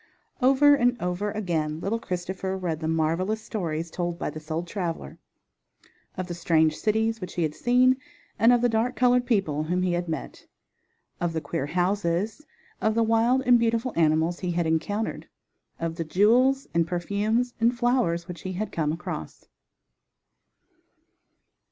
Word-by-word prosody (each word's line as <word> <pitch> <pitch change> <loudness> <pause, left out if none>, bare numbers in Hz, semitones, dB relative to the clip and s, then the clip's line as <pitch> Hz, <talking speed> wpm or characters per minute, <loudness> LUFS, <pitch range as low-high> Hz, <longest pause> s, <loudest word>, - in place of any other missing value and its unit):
Over 275 +3 +6
and 245 -3 +2
over 180 +4 -2
again 165 -7 -2
little 205 +6 -1
Christopher 190 0 -4
read 170 -4 -3
the 160 - -3
marvelous 165 +6 0
stories 165 -6 -3
told 175 0 -3
by - - -3
this 155 0 -10
old 165 +2 -2
traveler, 170 - -4 1.0
of 185 - -2
the 175 - -5
strange 160 -2 +2
cities 220 +3 0
which 185 - -7
he 175 - 0
had 155 -2 -1
seen 250 +6 +3 0.4
and 225 +3 +6
of 245 -1 +4
the 245 - +4
dark 235 +2 0
colored 250 -1 +3
people 160 - +1
whom 180 +3 0
he 180 -1 +1
had 175 0 -2
met; 160 - -6 0.7
of 175 -1 -1
the 160 - -1
queer 145 -2 -3
houses; 180 - 0 0.4
of 220 0 +1
the 230 - +3
wild 230 +4 +2
and 245 -2 +5
beautiful 230 +2 0
animals 160 +1 +2
he 180 - -3
had 170 0 0
encountered; 205 +7 -1 0.5
of 165 0 -3
the 165 - -1
jewels 240 - +3
and 170 0 +2
perfumes 210 +7 -1
and 235 +2 +2
flowers 235 -9 +1
which 180 -2 -8
he 185 - -5
had 210 +4 -3
come 155 -3 0
across. 160 - -6
185 Hz, 160 wpm, -26 LUFS, 165-230 Hz, 1.0 s, Over